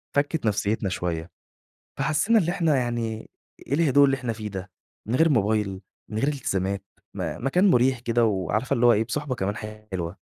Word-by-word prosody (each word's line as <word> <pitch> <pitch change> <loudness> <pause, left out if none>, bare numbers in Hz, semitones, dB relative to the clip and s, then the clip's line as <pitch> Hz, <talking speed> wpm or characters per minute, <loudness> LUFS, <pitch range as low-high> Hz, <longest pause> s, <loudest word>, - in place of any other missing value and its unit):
فكِّت 145 -1 0
نفسيتنا 105 -1 0
شوية، 85 -2 -3 0.7
فحسينا 155 +12 +3
اللي 175 -2 +1
إحنا 160 -6 +2
يعني 120 -3 -2 0.4
إيه 140 - 0
الهدوء 145 -3 +5
اللي 135 -1 +3
إحنا 125 -3 -3
فيه 105 -1 -6
ده 95 -1 -7 0.4
من 120 - -1
غير 165 +1 +5
موبايل، 105 -6 +1 0.3
من 105 - -3
غير 135 - +1
التزامات، 100 -8 -2 0.3
م - - -4
مكان 180 +7 +4
مُريح 125 +1 +3
كده 120 -1 +1
وعارفة 105 +4 0
اللي 120 +1 +3
هو 120 - +7
إيه 110 +1 +2
بصحبة 140 +3 -3
كمان 100 -1 -2 0.4
حلوة 85 0 -3
120 Hz, 175 wpm, -25 LUFS, 100-140 Hz, 0.7 s, هو